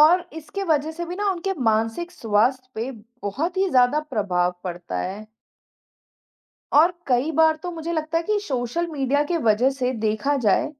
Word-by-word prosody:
और 330 +4 +7
इसके 320 +5 -6
वजह 310 -3 +1
से 345 +2 -5
भी 355 +1 -5
ना, 410 +1 0
उनके 385 +1 -2
मानसिक 225 +10 0
स्वास्थ्य 240 +2 +1
पे 230 +4 -3 0.3
बहुत 310 - -2
ही 385 +1 +2
ज़्यादा 255 +2 +4
प्रभाव 200 -11 0
पड़ता 175 - -4
है। 200 - -5 1.5
और 320 +5 +6
कई 255 +4 +2
बार 320 -1 +5
तो 360 - -3
मुझे 335 0 -4
लगता 315 0 0
है 335 - -4
कि 425 +2 +1
सोशल 280 - -2
मीडिया 285 -1 +1
के 345 - +2
वजह 235 +5 +4
से 260 -2 -1
देखा 220 +7 +1
जाए, 200 - +3
285 Hz, 170 wpm, -23 LUFS, 225-335 Hz, 1.5 s, और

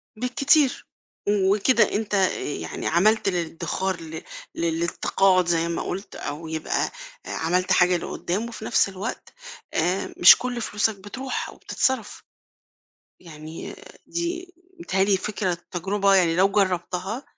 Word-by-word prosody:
بالكتير، 260 +4 +2 0.4
وكده 205 +4 +3
أنت 210 0 -2 0.3
يعني 145 - -4
عملت 205 +5 +3
للادخار 175 +1 -2
ل 160 0 -8 0.3
للتقاعد 170 +3 +1
زي 170 -1 +1
ما 170 - -2
قُلت، 195 +3 -5
أو 155 +3 -6
يبقى، 160 0 -2 0.3
آآ، - - -8
عملت 180 +3 0
حاجة 180 0 +4
لقدام، 185 +5 -3
وفي 220 -2 -8
نفس - - +3
الوقت، 195 +5 -6 0.4
آآ، 180 +4 0
مش 175 - +9
كل 245 -1 -4
فلوسك 210 0 0
بتروح 245 +7 -5
أو - - -12
بتتصرف. 260 -5 -1 1.0
يعني 160 -2 -9 0.3
دي 350 +1 -4 0.3
متهيأ 195 - +1
لي 200 -1 +3
فكرة 190 -1 -2 0.2
تجربة 195 +2 +1
يعني 175 -3 +3
لو 190 +2 +5
جربتها، 190 +3 -1
190 Hz, 125 wpm, -24 LUFS, 175-215 Hz, 1.0 s, مش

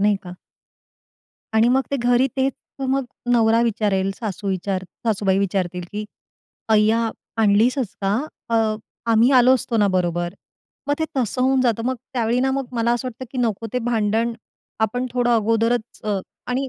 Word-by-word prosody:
नाही 205 0 +3
का? 180 - -7 1.2
आणि 220 +2 +5
मग 260 +2 +3
ते 280 - +1
घरी 245 +1 +3
तेच 270 0 +2 0.4
मग 270 0 +1 0.3
नवरा 230 -1 +4
विचारेल, 205 -4 +1
सासू 205 -3 -4
विचार 190 0 -1 0.2
सासूबाई 195 -3 +2
विचारतील 180 -2 -1
की 210 +1 -3 0.7
"अय्या, 220 +2 +3 0.3
आणलीसच 225 +3 +2
का? 195 0 +1 0.4
अ, - - +1 0.6
आम्ही 230 +3 +5
आलो 250 +1 +6
असतो 245 -2 -2
ना 205 -2 +4
बरोबर." 175 0 -1 0.5
मग 290 - +3
ते 320 - +1
तसं 255 0 0
होऊन 265 0 +3
जातं. 235 -3 +1
मग 260 - +1 0.2
त्यावेळी 235 0 +1
ना, 265 +1 +2
मग 270 0 -1
मला 235 0 +1
असं 250 +2 -1
वाटतं 250 +1 -8
की 260 - -4
नको 225 -2 0
ते 250 - +1
भांडण. 225 0 +1 0.5
आपण 245 +4 0
थोडं 245 -1 +2
अगोदरच 230 +1 0
अ, 210 -2 0 0.3
आणि 260 +2 -1
230 Hz, 160 wpm, -22 LUFS, 205-250 Hz, 1.2 s, आलो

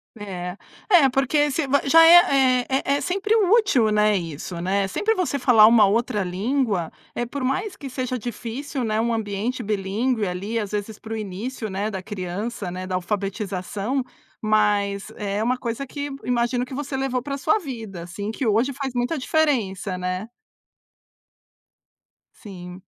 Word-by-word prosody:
É, 185 -3 -6 0.3
é 335 -9 +6
porque 280 +3 +2
se 280 +1 -1
v 280 +1 +3
já 330 +4 +7
é 270 -7 +6
é 265 0 +1 0.2
é - - -4
sempre 405 +4 0
útil, 395 - +4
né, 210 0 +3
isso, 170 +1 -6
né, 195 +3 0
sempre 420 - 0
você 360 -8 -1
falar 235 -5 +6
uma 225 -3 +6
outra 210 0 +1
língua, 200 - -1 0.2
eh, 240 - -2
por 265 +2 -5
mais 270 +10 -1
que 280 - -8
seja 255 0 -3
difícil, 245 +4 -5
né, 215 -1 0
um 235 +1 +1
ambiente 220 +3 -2
bilíngue 215 +3 -1
ali, 195 +5 -3
às 210 -3 -3
vezes 210 0 -4
para 225 - -8
o 225 - -2
início, 215 +4 -5
né, 200 +3 -2
da 190 - -4
criança, 195 +1 -5
né, 185 +1 -6
da 185 - -2
alfabetização, 200 +5 -2 0.4
mas 210 -1 +1
é 205 0 -2
uma 250 +2 +1
coisa 245 +2 -4
que 285 +2 -5
imagino 245 0 0
que 255 - -10
você 280 0 -3
levou 265 -2 -1
para 275 +2 -4
sua 425 +9 +2
vida 225 - -7
assim, 200 +5 -5
que 260 - -3
hoje 235 +6 +2
faz 270 -1 -4
muita 245 +6 0
diferença, 220 -11 0
né. 185 +3 -3 2.1
Sim. 185 -4 -10
225 Hz, 160 wpm, -23 LUFS, 200-265 Hz, 2.1 s, já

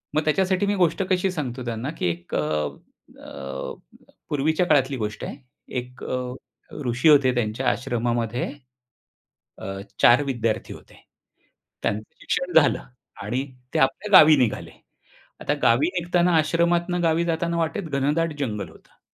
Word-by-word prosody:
मग 155 - +2
त्याच्यासाठी 185 +5 +2
मी 205 0 +1
गोष्ट 180 0 +2
कशी 185 0 +1
सांगतो 130 -7 -4
त्यांना 120 +3 -3
की - - 0
एक 85 0 -7
अ, - - +2 0.8
अ, 70 0 -7 0.6
पूर्वीच्या 155 +4 +1
काळातली 140 -3 +3
गोष्ट 105 -2 -4
आहे, - - -6 0.4
एक 125 0 -6
अ, 130 - -2 0.7
ऋषी 125 +6 +3
होते 140 -4 +5
त्यांच्या 120 +2 -1
आश्रमामध्ये, 120 -1 -1 1.1
अ, 95 0 -6 0.2
4 125 +4 +6
विद्यार्थी 115 -5 -2
होते. - - -16 0.8
त्यांचं 105 +1 0 0.2
शिक्षण 180 0 -2
झालं 145 - +1 0.4
आणि 125 +7 -2 0.3
ते - - +1
आपल्या 135 +10 +4
गावी 155 0 +8
निघाले. 120 -5 0 0.7
आता - - 0
गावी 125 +7 +4
निघताना 175 0 +2
आश्रमातून 170 +2 +1
गावी 165 0 +2
जाताना 170 0 -1
वाटेत 170 +5 -1
घनदाट 150 +4 +1
जंगल 105 -7 -3
होतं - - -21
140 Hz, 135 wpm, -24 LUFS, 120-170 Hz, 1.1 s, गावी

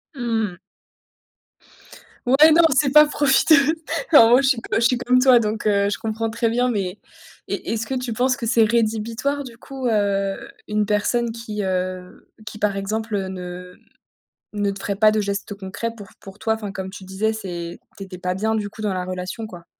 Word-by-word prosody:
Mmh 230 -3 -1
mh. 175 - -14 1.7
Ouais, 285 +6 +6
non, 335 - +6
c'est 275 +1 +2
pas 300 0 +9
profiter. 295 +1 +4 0.6
En 230 -5 +8
gros, 250 +3 +6
je 270 - +1
suis 260 - +2 0.2
je - - +3
suis 240 +2 +2
comme 250 +1 +2
toi, 255 -2 +6
donc 215 -1 -2
heu, 200 -1 +2
je - - -2
comprends 225 0 -3
très 230 +1 0
bien, 245 +2 +1
mais 195 -3 -3 0.5
est - - -4
est-ce 225 0 -2
que 265 - -3
tu 250 -2 -3
penses 255 +3 +1
que 235 - -4
c'est 230 0 +3
rédhibitoire 230 +5 0
du 235 -3 -11
coup, 265 0 -6
heu, 200 -2 0 0.3
une 210 0 +1
personne 225 +3 0
qui, 215 -3 -5
heu, 185 -1 -4 0.2
qui 215 -1 -8
par 205 -2 0
exemple, 215 +3 -3
heu, 190 -1 -2
ne 180 -1 -8 0.8
ne 205 -1 0
te 195 - -7
ferait 200 -1 -3
pas 215 +1 +5
de 215 0 0
gestes 200 0 -3
concrets 200 +4 -5
pour 205 -3 -11
pour 195 +1 -13
toi? 220 0 0
Enfin 210 -3 -6
comme 190 -1 -5
tu 190 0 -10
disais, 210 +4 -1
c'est 175 -5 -6 0.2
tu 195 - -6
étais 185 -1 -9
pas 180 0 -3
bien 220 +3 -1
du 205 -2 -2
coup 220 - -12
dans 210 -3 -1
la 180 -1 -3
relation 185 +4 -5
quoi. 175 -4 -12
215 Hz, 205 wpm, -22 LUFS, 195-235 Hz, 1.7 s, pas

